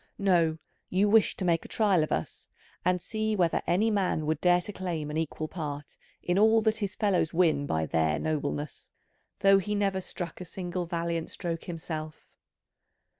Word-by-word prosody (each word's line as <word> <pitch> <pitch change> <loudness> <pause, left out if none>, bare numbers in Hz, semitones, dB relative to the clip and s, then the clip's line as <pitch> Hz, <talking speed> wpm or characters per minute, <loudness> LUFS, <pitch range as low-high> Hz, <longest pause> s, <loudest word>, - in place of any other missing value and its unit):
No, 170 -5 +2 0.3
you 195 +3 +2
wished 220 0 +4
to 190 - -2
make 170 -2 +1
trial 200 -6 +3
of 155 - -4
us 80 - -3 0.3
and 180 0 +2
see 215 +4 -2
whether 175 -4 +2
any 215 +6 +2
man 185 -6 0
would 155 0 -1
dare 180 0 +5
to 210 - -7
claim 165 -6 -3
an 155 - -3
equal 160 0 -2
part 150 -4 -6 0.3
in 175 +2 +1
all 220 +1 +6
that 220 0 +2
his 200 -3 -3
fellows 190 -7 +1
win 160 -5 +3
by 80 0 0
their 80 -1 +1
nobleness, 150 - -3 0.5
though 195 0 +6
he 210 +2 -2
never 195 -2 0
struck 175 -1 -6
a - - -5
single 175 0 -4
valiant 170 -1 -2
stroke 170 -3 -4
himself. 155 -2 -6
175 Hz, 175 wpm, -28 LUFS, 155-195 Hz, 0.5 s, all